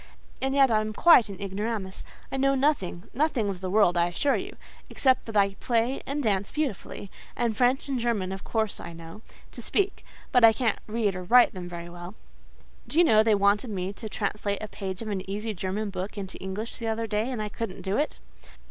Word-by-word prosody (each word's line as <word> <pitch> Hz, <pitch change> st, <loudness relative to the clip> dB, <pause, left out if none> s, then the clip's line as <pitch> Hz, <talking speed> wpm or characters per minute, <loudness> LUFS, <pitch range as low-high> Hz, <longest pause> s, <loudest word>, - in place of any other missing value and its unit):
And 270 Hz, +1 st, 0 dB
yet 270 Hz, -3 st, +5 dB
I 215 Hz, -1 st, +3 dB
am 215 Hz, 0 st, -4 dB
quite 245 Hz, -4 st, +6 dB
an 195 Hz, -, -8 dB
ignoramus. 200 Hz, 0 st, -4 dB, 0.3 s
I -, -, -2 dB
know 275 Hz, +1 st, +3 dB
nothing—nothing 260 Hz, -, 0 dB
in 195 Hz, -2 st, -3 dB
the 185 Hz, 0 st, -4 dB
world—I 180 Hz, -4 st, +4 dB
assure 275 Hz, +11 st, +1 dB
you; -, -, -5 dB, 0.3 s
except 260 Hz, -2 st, +2 dB
that 220 Hz, -2 st, -2 dB
I 200 Hz, -1 st, +4 dB
play 235 Hz, +5 st, 0 dB
and 285 Hz, +1 st, -2 dB
dance 200 Hz, -3 st, 0 dB
beautifully,—and 235 Hz, -4 st, -4 dB
French 250 Hz, +4 st, +2 dB
and 270 Hz, -3 st, -1 dB
German 225 Hz, -6 st, -1 dB
of 190 Hz, 0 st, -6 dB
course 220 Hz, -3 st, -1 dB
I 170 Hz, -, -8 dB
know, 165 Hz, +5 st, -11 dB, 0.3 s
to -, -, -7 dB
speak; 395 Hz, -1 st, -1 dB, 0.3 s
but 250 Hz, -, +4 dB
I 225 Hz, 0 st, +9 dB
can't 230 Hz, -2 st, 0 dB
read 215 Hz, -3 st, 0 dB
or 185 Hz, -, -4 dB
write 240 Hz, +6 st, +5 dB
them 180 Hz, -2 st, -7 dB
very 170 Hz, -1 st, -7 dB
well. 175 Hz, +3 st, -9 dB, 0.7 s
Do 300 Hz, -, -3 dB
you 345 Hz, -, +8 dB
know 215 Hz, -9 st, +6 dB
they 220 Hz, -1 st, +4 dB
wanted 200 Hz, +4 st, +2 dB
me 190 Hz, -1 st, -3 dB
to 220 Hz, +2 st, -7 dB
translate 205 Hz, 0 st, -2 dB
a -, -, -3 dB
page 195 Hz, 0 st, -5 dB
of -, -, -7 dB
an 190 Hz, -2 st, -4 dB
easy 210 Hz, +2 st, -3 dB
German 200 Hz, +3 st, -3 dB
book 190 Hz, +2 st, -5 dB
into 190 Hz, -1 st, -6 dB
English 195 Hz, +4 st, -5 dB
the 230 Hz, -, -3 dB
other 225 Hz, +1 st, -1 dB
day, 215 Hz, +2 st, -1 dB
and 250 Hz, -4 st, -3 dB
I 210 Hz, 0 st, -2 dB
couldn't 215 Hz, -2 st, -5 dB
do 195 Hz, +1 st, -1 dB
it. 300 Hz, -, -1 dB
215 Hz, 210 wpm, -27 LUFS, 190-240 Hz, 0.7 s, I